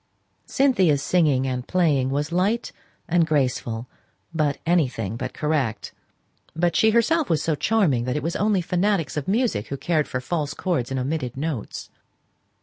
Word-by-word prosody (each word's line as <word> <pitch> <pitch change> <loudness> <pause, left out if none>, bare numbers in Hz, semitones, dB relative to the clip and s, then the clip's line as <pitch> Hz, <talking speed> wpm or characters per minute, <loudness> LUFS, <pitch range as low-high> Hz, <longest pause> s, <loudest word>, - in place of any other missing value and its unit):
Cynthia's 190 - +2
singing 150 -7 +2
and 125 -1 -3
playing 150 -8 +2
was 145 +3 -2
light 200 +7 0 0.4
and 170 0 +3
graceful, 125 -5 -1 0.5
but 150 -3 0
anything 130 - 0
but - - -4
correct; 140 -9 -1 0.6
but 170 +1 +1
she 220 - +5
herself 235 +7 +2
was 160 -3 +1
so 160 - +1
charming, 150 - +1
that 125 +2 -1
it - - -3
was 165 +2 -2
only 205 -2 +2
fanatics 180 0 0
for 150 +3 -3
music 220 - 0
who 140 - -4
cared 155 0 0
for 130 - -3
false 150 +2 -3
chords 165 -10 -1
and 135 -1 -2
omitted 130 -2 -3
notes. 145 -6 -4
155 Hz, 155 wpm, -23 LUFS, 130-180 Hz, 0.6 s, she